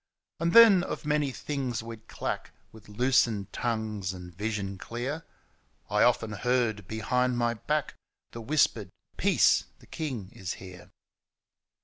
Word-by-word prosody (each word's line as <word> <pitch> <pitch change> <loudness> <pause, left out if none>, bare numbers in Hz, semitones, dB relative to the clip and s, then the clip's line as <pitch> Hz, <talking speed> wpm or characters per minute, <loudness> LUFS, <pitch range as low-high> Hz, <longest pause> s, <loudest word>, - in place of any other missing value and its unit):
And 170 +1 0
then 225 -5 +9
of - - -5
many 150 -1 +1
things 130 -4 -3
we'd 115 -1 -10
clack - - -4 0.2
With 110 -1 -15
loosened 115 -3 +1
tongues 110 -5 -2
and 90 -1 -10
visions 100 0 -3
clear 125 - -4
^ - - -23 0.7
I - - +3
often 115 -1 +3
heard 110 -3 0
behind 120 +4 0
my 120 -1 +1
back 150 +6 -2 0.4
The, 115 - -7
whispered 115 -6 +1 0.2
' - - -40
Peace, - - +4
the - - -19
king 125 -12 -5
is 95 -1 -5
here 90 -2 -11
115 Hz, 140 wpm, -28 LUFS, 105-135 Hz, 0.7 s, then